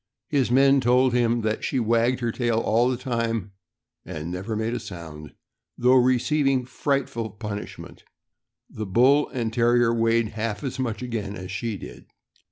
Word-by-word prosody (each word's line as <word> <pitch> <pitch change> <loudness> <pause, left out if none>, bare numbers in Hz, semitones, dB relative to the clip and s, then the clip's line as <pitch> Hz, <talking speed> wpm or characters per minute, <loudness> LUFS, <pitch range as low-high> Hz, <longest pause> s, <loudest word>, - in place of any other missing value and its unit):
His 140 -5 +1
men 135 +2 +5
told 125 +1 +3
him 120 -1 +2
that 110 0 -2
she 135 - 0
wagged 115 +2 +1
her 120 -1 0
tail 120 -1 0
all 115 +2 +2
the 130 - -1
time, 115 -5 -2 0.5
and 80 +2 -6
never 95 +5 -4
made 110 +2 -2
a 120 - -2
sound, 85 -8 -10 0.4
though 125 +1 +4
receiving 130 +1 +2
frightful 125 -2 -2
punishment. 105 0 -8 0.6
The 110 -1 -6
Bull 130 +9 +4
and 115 -4 -3
Terrier 120 0 +3
weighed 115 -1 +2
half 110 +2 -4
as 135 -1 -4
much 120 -2 -2
again 110 -5 -4
as 95 -1 -7
she 105 +2 -3
did. - - -11
115 Hz, 160 wpm, -24 LUFS, 110-125 Hz, 0.6 s, men